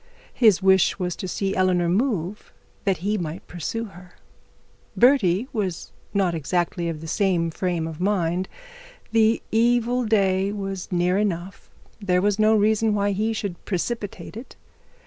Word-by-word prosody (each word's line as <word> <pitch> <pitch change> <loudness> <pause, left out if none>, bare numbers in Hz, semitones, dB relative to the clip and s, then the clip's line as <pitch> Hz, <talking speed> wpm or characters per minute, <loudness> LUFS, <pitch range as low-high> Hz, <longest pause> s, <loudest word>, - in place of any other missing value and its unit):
His 210 -6 +4
wish 190 -1 +4
was 180 -2 -2
to 185 - -5
see 195 +2 -2
Eleanor 180 -2 +2
move, 200 - -1 0.3
that 195 -3 +2
he 210 0 +1
might 165 +1 -5
pursue 200 +7 -4
her. 180 -3 -14 0.8
Bertie 240 -5 +4
was 190 -7 -3 0.2
not 195 -4 +1
exactly 170 +2 -1
in 165 -2 -4
the 160 - -7
same 175 -2 +1
frame 175 -1 -2
of 160 -1 -7
mind; 185 -2 0 0.6
the 225 0 +3
evil 240 +2 +2
of 250 - -1
the 220 - +3
day 190 -1 +2
was 195 -3 -5
near 180 +2 +2
enough; 190 -2 -3 0.3
there 185 -3 +1
was 205 +2 +1
no 215 +1 +5
reason 215 +1 +2
why 205 0 +1
he 215 +3 0
should 200 -5 -4
precipitate 205 +2 -4
it. 235 +4 -10
195 Hz, 155 wpm, -23 LUFS, 180-215 Hz, 0.8 s, no